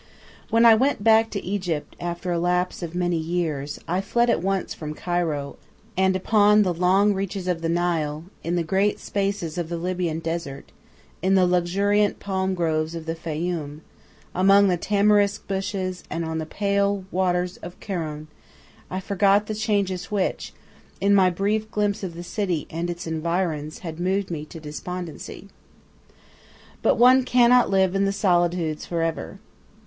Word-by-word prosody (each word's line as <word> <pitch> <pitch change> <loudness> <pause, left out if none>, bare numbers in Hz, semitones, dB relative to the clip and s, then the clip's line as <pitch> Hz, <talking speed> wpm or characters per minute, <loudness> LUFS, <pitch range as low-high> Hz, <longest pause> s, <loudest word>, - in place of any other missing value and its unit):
When 230 +1 +4
I 230 - +9
went 255 -1 +1
back 225 0 +5
to 200 - -5
Egypt, 180 -5 -3
after 175 +1 -4
a 170 - 0
lapse 180 +1 0
of 170 0 -6
many 175 -1 0
years, 160 -4 -2
I 180 +3 0
fled 235 +4 +2
at - - 0
once 195 0 -1
from 155 -1 -6
Cairo, 165 -6 -2 0.4
and 190 0 +2
upon 210 +2 +4
the 180 -3 0
long 190 +4 +3
reaches 195 -1 -4
of 175 -2 -1
the 165 - -1
Nile, 165 -3 0 0.2
in 170 +1 -1
the 175 - +1
great 195 +5 +1
spaces 195 -4 -2
of 165 -2 -3
the 170 - -3
Libyan 175 -2 -2
Desert, 165 -4 -5 0.5
in 190 +1 +3
the 185 -1 +5
luxuriant 195 +4 +1
palm 190 -1 -1
grooves 160 -1 -1
of 165 -1 -6
the 165 - -2
Fayyum, 160 -2 -4 0.5
among 195 +2 +5
the 180 - +3
tamarisk 205 +2 +2
bushes 190 -2 -3
and 165 0 -3
on 160 0 -3
the 160 - -4
pale 200 +1 0
waters 180 -1 0
of 175 +1 -10
Kurun, 155 -6 -4 0.6
I 185 - -3
forgot 200 +1 +2
the 215 - -4
changes 200 -4 -1
which, 200 -3 -2 0.5
in 200 +1 +3
my 190 -2 +5
brief 210 +4 -1
glimpse 205 -1 -1
of 180 -4 -5
the 175 - -7
city 175 -3 -2
and 170 +2 -3
its 175 0 -5
environs, 160 -1 -2
had 160 0 -6
moved 190 +1 -1
me 155 -2 -4
to 165 - -10
despondency. 175 +4 -7 1.3
But - - +3
one 255 +2 +6
cannot 245 0 +4
live 190 -1 +2
in 195 0 +2
the 195 - +1
solitudes 175 -5 +1
for 170 -1 -1
ever. 165 +3 -3
180 Hz, 165 wpm, -24 LUFS, 165-200 Hz, 1.3 s, I